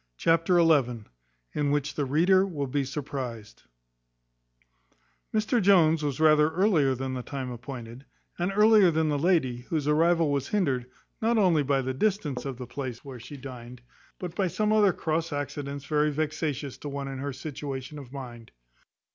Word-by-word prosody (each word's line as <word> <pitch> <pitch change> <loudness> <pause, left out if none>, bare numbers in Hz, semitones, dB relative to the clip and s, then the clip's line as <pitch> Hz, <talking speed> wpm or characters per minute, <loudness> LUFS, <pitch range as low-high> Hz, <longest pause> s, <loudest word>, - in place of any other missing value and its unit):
In 145 -1 0
which 145 0 0
the 145 - -1
reader 175 +8 +4
will 160 -8 -3
be 140 +2 -1
surprized. 130 -5 -6 1.7
Mr 220 +2 +1
Jones 165 -5 +5
was 145 -2 -2
rather 155 -1 +5
earlier 160 -7 +2
than 130 +1 -4
the 130 - -3
time 130 -1 -5
appointed, 120 0 -8 0.3
and 175 +3 0
earlier 210 -2 +6
than 160 -1 +1
the 145 -1 0
lady; 155 -7 +2
whose 155 -3 -1
arrival 165 +1 +3
was 140 -1 -1
hindered, 135 -12 0 0.3
not 230 +1 +2
only 180 -7 +4
by 140 -1 +1
the 130 +1 -2
distance 150 -6 -1
of 135 -3 -4
the 125 - -6
place 130 -1 -6
where 130 -3 -8
she 140 +6 -10
dined, 125 -2 -10 0.4
but 180 -2 -6
by 190 0 0
some 210 +4 0
other 210 -3 +5
cross 165 0 -2
accidents 145 -1 -4
very 150 0 +2
vexatious 150 -2 -3
to 145 - -6
one 140 0 -4
in 135 -1 -6
her 140 +1 -3
situation 140 0 -6
of 130 -3 -11
mind. 120 -4 -9
145 Hz, 160 wpm, -27 LUFS, 130-165 Hz, 1.7 s, earlier